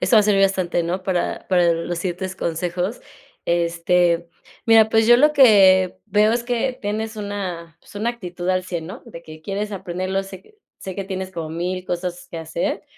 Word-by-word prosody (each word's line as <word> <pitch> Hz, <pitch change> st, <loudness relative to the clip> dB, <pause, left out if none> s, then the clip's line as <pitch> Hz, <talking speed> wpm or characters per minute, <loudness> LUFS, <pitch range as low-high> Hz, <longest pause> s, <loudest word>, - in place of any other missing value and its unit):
Eso 230 Hz, -, +3 dB
va -, -, +8 dB
a -, -, +2 dB
servir 200 Hz, -1 st, +3 dB
bastante, 185 Hz, -3 st, +1 dB
¿no? 180 Hz, +3 st, -3 dB
Para, 185 Hz, -2 st, -2 dB
para 175 Hz, -2 st, +4 dB
los 170 Hz, +1 st, -3 dB
siguientes 185 Hz, +1 st, -4 dB
consejos. 180 Hz, +5 st, -3 dB, 0.4 s
Este, 170 Hz, 0 st, +1 dB, 0.4 s
mira, 225 Hz, -1 st, +6 dB
pues 225 Hz, 0 st, +3 dB
yo 240 Hz, 0 st, +7 dB
lo 300 Hz, +4 st, +4 dB
que 195 Hz, -9 st, +6 dB
veo 210 Hz, +2 st, +3 dB
es 235 Hz, 0 st, -1 dB
que 250 Hz, +1 st, -1 dB
tienes 220 Hz, +1 st, -3 dB
una, 185 Hz, -6 st, -5 dB
pues -, -, -18 dB
una 230 Hz, +3 st, 0 dB
actitud 180 Hz, -6 st, -7 dB
al 185 Hz, 0 st, +1 dB
100 170 Hz, -3 st, -5 dB
¿no? 185 Hz, -, -9 dB
De 170 Hz, -8 st, -11 dB
que 155 Hz, 0 st, -12 dB
quieres 205 Hz, +3 st, -3 dB
aprenderlo, 185 Hz, +1 st, -3 dB
sé 190 Hz, -1 st, -11 dB
que 430 Hz, -, -25 dB, 0.2 s
sé 190 Hz, -, -7 dB
que 195 Hz, -, -2 dB
tienes 190 Hz, -1 st, -5 dB
como 165 Hz, -3 st, -5 dB
1000 180 Hz, +3 st, -3 dB
cosas 180 Hz, 0 st, -4 dB
que 165 Hz, -, -7 dB
hacer, 160 Hz, +1 st, -3 dB
185 Hz, 195 wpm, -21 LUFS, 175-210 Hz, 0.4 s, va